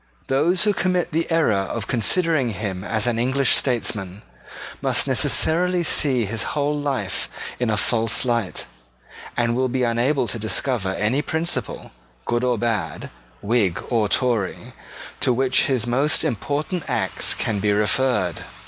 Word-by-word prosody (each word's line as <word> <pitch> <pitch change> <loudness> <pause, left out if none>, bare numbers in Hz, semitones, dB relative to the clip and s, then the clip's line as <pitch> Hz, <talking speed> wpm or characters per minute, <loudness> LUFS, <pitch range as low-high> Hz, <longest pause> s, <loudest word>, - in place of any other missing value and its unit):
Those 160 +7 +2
who 210 -1 +3
commit 180 -2 0
the 165 +2 -1
error 165 -9 +3
of 100 +3 -2
considering 140 - +1
him 95 -2 -4
as 110 +1 0
an 120 -2 0
English 130 +2 +2
statesman 105 -6 -1 0.6
must - - +2
necessarily 180 +2 +2
see 135 -7 +2
his 115 +2 -3 0.2
whole 145 +1 +1
life 135 -10 -2 0.3
in 120 -2 0
a 110 - +1
false 115 +2 +1
light, 115 -6 -1 0.7
and 120 -1 +1
will 130 +1 +1
be 130 +1 0
unable 120 +3 +1
to 115 - -4
discover 110 -3 0
any 115 +7 +1
principle, 160 +2 -3 0.3
good 120 +1 0
or 125 -2 +1
bad, 115 -2 -2 0.3
Whig 100 -5 +1
or 110 -4 +2
Tory, 120 -7 0 0.5
to - - +2
which 130 +1 +2
his 125 -5 0
most 135 +6 +2
important 150 - -2
acts - - 0
can 105 -3 -1
be 105 +1 +1
referred. 105 - +1
120 Hz, 145 wpm, -22 LUFS, 110-145 Hz, 0.7 s, who